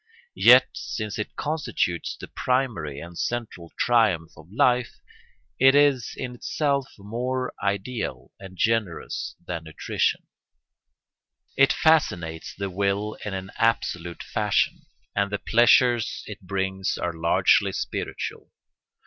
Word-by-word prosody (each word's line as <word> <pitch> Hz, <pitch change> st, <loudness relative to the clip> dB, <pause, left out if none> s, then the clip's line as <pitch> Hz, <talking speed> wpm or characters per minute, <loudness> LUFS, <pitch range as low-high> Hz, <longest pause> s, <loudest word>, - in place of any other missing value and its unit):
Yet, -, -, +8 dB
since 110 Hz, -1 st, -5 dB
it 105 Hz, -, -4 dB
constitutes 145 Hz, -, -2 dB
the -, -, -8 dB
primary 110 Hz, -, -1 dB
and 85 Hz, +2 st, -10 dB
central 110 Hz, -8 st, -4 dB
triumph 105 Hz, -9 st, +2 dB
of 80 Hz, +4 st, -16 dB
life, 125 Hz, 0 st, +2 dB, 0.6 s
it 135 Hz, +1 st, +6 dB
is 140 Hz, -5 st, +3 dB
in 125 Hz, -2 st, -4 dB
itself 140 Hz, +2 st, -1 dB
more 125 Hz, +5 st, -3 dB
ideal 100 Hz, +5 st, -3 dB
and 95 Hz, -1 st, -11 dB
generous 110 Hz, -6 st, -1 dB
than 85 Hz, -2 st, -5 dB
nutrition; 80 Hz, -, -1 dB, 1.3 s
it 135 Hz, 0 st, +5 dB
fascinates 85 Hz, -, +1 dB
the 100 Hz, 0 st, -3 dB
will 100 Hz, +3 st, -1 dB
in 105 Hz, -2 st, -4 dB
an 95 Hz, 0 st, -6 dB
absolute 90 Hz, -7 st, 0 dB
fashion, -, -, 0 dB, 0.3 s
and 100 Hz, 0 st, +1 dB
the 100 Hz, -, 0 dB
pleasures 120 Hz, +1 st, +3 dB
it 105 Hz, -2 st, -9 dB
brings 95 Hz, 0 st, -2 dB
are 85 Hz, -, -2 dB
largely 80 Hz, +1 st, +3 dB
spiritual. -, -, -4 dB
105 Hz, 115 wpm, -25 LUFS, 90-125 Hz, 1.3 s, Yet